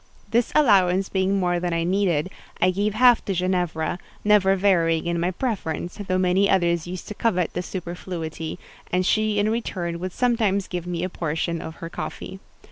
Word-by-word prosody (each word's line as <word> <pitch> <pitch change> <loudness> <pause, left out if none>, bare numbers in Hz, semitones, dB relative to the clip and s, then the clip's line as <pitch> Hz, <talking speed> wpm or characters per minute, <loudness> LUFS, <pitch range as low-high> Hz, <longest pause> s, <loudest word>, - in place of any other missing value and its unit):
This 235 +1 +2
allowance 195 -8 +4
being 190 +1 +1
more 175 -1 +1
than 175 -1 -2
I 165 0 0
needed, 185 -2 +1 0.3
I 185 - +4
gave 205 +3 -1
half 245 0 +5
to 195 - -1
Ginevra; 180 -2 -1 0.2
never 205 -2 +4
varying 170 -4 +2
in 170 0 -1
my 175 +2 +1
preference, 180 - -3
though 185 - +1
many 185 +2 +3
others 170 -3 +2
used 180 0 -6
to - - -4
covet 185 -6 0
the 180 - -2
superfluity; 170 -3 -5 0.3
and 180 +1 +1
she 215 +1 +2
in 205 +1 +2
return 175 -7 -3
would 185 +1 -4
sometimes 220 -4 +1
give 175 -1 -5
me 175 -1 -2
a 185 - -1
portion 165 0 -2
of 160 - -7
her 165 - -7
coffee. 190 - -6
185 Hz, 180 wpm, -24 LUFS, 170-200 Hz, 0.3 s, half